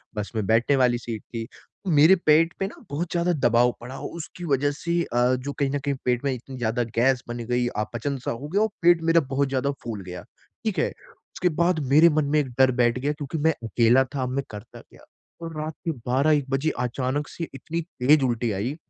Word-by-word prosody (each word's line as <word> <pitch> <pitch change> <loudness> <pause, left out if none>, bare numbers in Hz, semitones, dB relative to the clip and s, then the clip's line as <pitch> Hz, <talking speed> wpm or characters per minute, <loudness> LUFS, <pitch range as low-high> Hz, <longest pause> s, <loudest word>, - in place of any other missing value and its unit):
बस 105 -1 -4
में 110 -2 -1
बैठने 115 +5 +3
वाली 125 -2 +3
सीट 115 -3 -6
थी। 115 -1 -4 0.4
मेरे 160 +2 +6
पेट 165 +3 +4
पे 195 - 0
ना - - -10
बहुत 165 +4 -3
ज़्यादा 175 0 +1 0.2
दबाव 120 +1 +4
पड़ा 125 +3 -8
और - - -6
उसकी 170 +2 -8
वजह 145 -1 +1
से 165 +4 -4
अ, 125 -1 +1
जो 130 +3 -5
कहीं 140 -1 +1
न 145 - -1
कहीं 140 -1 0
पेट 125 0 +1
में 140 - +2
इतनी 130 +1 -8
ज़्यादा 120 0 0
गैस 125 +2 +2
बन 120 0 -5
गई, 125 0 +1
अपचन 120 +5 -3
सा - - 0
हो 120 +5 -6
गया 195 +7 +1
और 220 - +3
पेट 170 -1 +5
मेरा 165 0 +5
बहुत 140 +1 +1
ज़्यादा 135 +1 0
फूल 110 -4 -5
गया। 90 -1 -7 0.4
ठीक - - 0
है? - - +2 0.5
उसके 180 - +1
बाद 170 -1 +3
मेरे 160 +3 +8
मन 150 - +1
में - - +5
एक 145 - 0
डर 130 0 +6
बैठ 120 +1 +2
गया, 140 +3 0
क्योंकि 145 +1 -5
मैं 160 +2 +3
अकेला 115 +3 +4
था, 135 - -1
अब 125 - -2
मैं 135 +2 -2
करता 105 +2 -10
क्या? - - -20 0.4
और 165 -1 -6
रात 155 +1 -4
के 165 - +1 0.2
12-1 140 +2 +2
बजे 135 +3 +1
अचानक 130 +4 -2
से 165 - -6
इतनी 160 +5 -4
तेज 150 -3 +2
उल्टी 120 -2 0
आई। 105 +8 -2
135 Hz, 225 wpm, -25 LUFS, 120-155 Hz, 0.5 s, मेरे